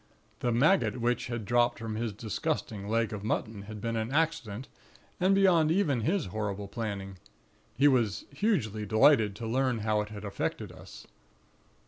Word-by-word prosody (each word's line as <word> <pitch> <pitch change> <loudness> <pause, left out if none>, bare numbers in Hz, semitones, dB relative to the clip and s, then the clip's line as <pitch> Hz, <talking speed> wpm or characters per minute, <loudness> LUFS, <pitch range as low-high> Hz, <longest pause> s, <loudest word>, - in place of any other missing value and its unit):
"The 120 - 0
maggot 140 +4 +3
which 120 +1 0
had 120 -3 -4
dropped 120 +2 +2
from 115 -1 -5
his 115 0 -2
disgusting 105 -1 -3
leg 115 -1 +1
of 105 -1 -5
mutton 110 -1 -2
had 110 -1 -7
been 115 +2 -2
an 110 +2 -2
accident, 135 -7 -1 0.5
and 190 +2 +4
beyond 180 -5 +4
even 160 - +2
his 175 - 0
horrible 105 -2 -3
planning. 100 -3 -5 0.6
He 140 +4 +5
was 120 -8 +2
hugely 140 - 0
delighted 110 0 +4
to 115 - -6
learn 125 0 0
how 105 -1 +2
it 105 - -6
had 105 -1 -8
affected 100 - -3
us. - - -12
115 Hz, 160 wpm, -29 LUFS, 105-135 Hz, 0.6 s, He